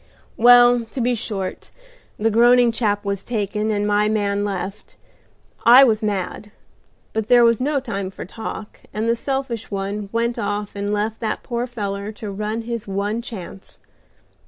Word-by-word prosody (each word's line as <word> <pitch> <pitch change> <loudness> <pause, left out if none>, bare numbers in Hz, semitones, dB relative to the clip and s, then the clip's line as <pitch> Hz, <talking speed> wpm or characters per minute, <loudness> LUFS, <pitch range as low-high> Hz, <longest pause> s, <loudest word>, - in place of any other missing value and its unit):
"Well, 245 0 +6
to 225 +4 -8
be 245 +1 +1
short, 205 -4 -4 0.5
the 225 +2 +1
groaning 240 +2 +5
chap 210 -3 -1
was 200 -1 -2
taken, 215 -1 -2
and 205 -1 0
my 210 0 +2
man 205 -1 0
left. 195 0 -5 0.7
I 245 +3 +9
was 220 -5 +3
mad, 205 0 -3 0.6
but 220 -1 -2
there 245 0 +6
was 230 0 +3
no 285 +2 +1
time 200 -7 -4
for 190 - -8
talk, 215 +2 -7 0.2
and 215 +2 -1
the 230 - +3
selfish 260 -2 -3
one 200 +1 -4
went 235 +1 -1
off 205 0 -3
and 200 0 -2
left 210 +2 -1
that 220 -2 -3
poor 240 0 -3
feller 205 -3 -4
to 210 -1 -7
run 215 +3 -3
his 235 -2 -5
one 200 +3 -2
chance. 195 -5 -10
215 Hz, 160 wpm, -21 LUFS, 205-235 Hz, 0.7 s, I